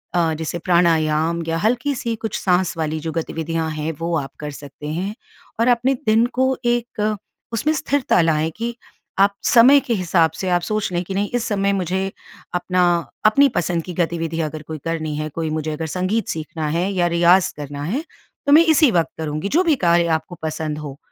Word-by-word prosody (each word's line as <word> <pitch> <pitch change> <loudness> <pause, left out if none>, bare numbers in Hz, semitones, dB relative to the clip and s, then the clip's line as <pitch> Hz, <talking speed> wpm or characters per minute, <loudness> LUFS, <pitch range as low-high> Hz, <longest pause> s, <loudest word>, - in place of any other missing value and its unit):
अ, 165 -2 +2
जैसे 160 +2 -4
प्राणायाम 165 -2 +2
या 165 0 0
हल्की-सी 240 +3 0
कुछ 220 0 -3
साँस 180 -1 +1
वाली 155 -1 -2
जो 160 +1 -3
गतिविधियाँ 165 0 -2
हैं 155 +1 -3
वो 165 0 -1
आप 135 -3 -4
कर 150 0 -5
सकते 145 +1 -10
हैं 190 +5 -3 0.5
और 230 - +3
अपने 245 +2 +3
दिन 220 +2 +4
को 260 0 +2
एक 235 -3 0 0.4
उसमें 300 +8 +1
स्थिरता 280 - +1
लाएँ 160 -1 +1
कि, 235 +1 -3 0.4
आप 200 +1 +5
समय 255 +4 +7
के 240 - -2
हिसाब 170 -4 +2
से 190 - -1
आप 175 -1 +2
सोच 215 +2 -2
लें 175 0 0
कि 195 - -5
नहीं 200 +1 0
इस 245 - 0
समय 200 -1 +1
मुझे 190 +1 -1 0.4
अपना 180 +1 0 0.4
अपनी 280 +7 +6
पसंद 170 -1 0
की 180 - -7
गतिविधि 165 -1 -2
अगर 155 0 -4
कोई 160 - -5
करनी 160 -2 -2
है, 155 0 -2
कोई 160 +1 -3
मुझे 155 0 -2
अगर 160 +1 -4
संगीत 185 +7 -1
सीखना 155 -2 -4
है 175 +5 0
या 175 -2 +2
रियाज़ 175 +2 +4
करना 145 -1 -6
है, 230 - -2 0.4
तो 285 - +2
मैं 320 +3 +8
इसी 310 -4 +5
वक़्त 170 -4 +1
करुँगी, 155 +3 -3
जो 340 - +3
भी 320 -3 +4
कार्य 170 0 +4
आपको 160 +3 -12
पसंद 155 -1 -3
हो। 145 -2 -7
175 Hz, 195 wpm, -21 LUFS, 160-215 Hz, 0.5 s, मैं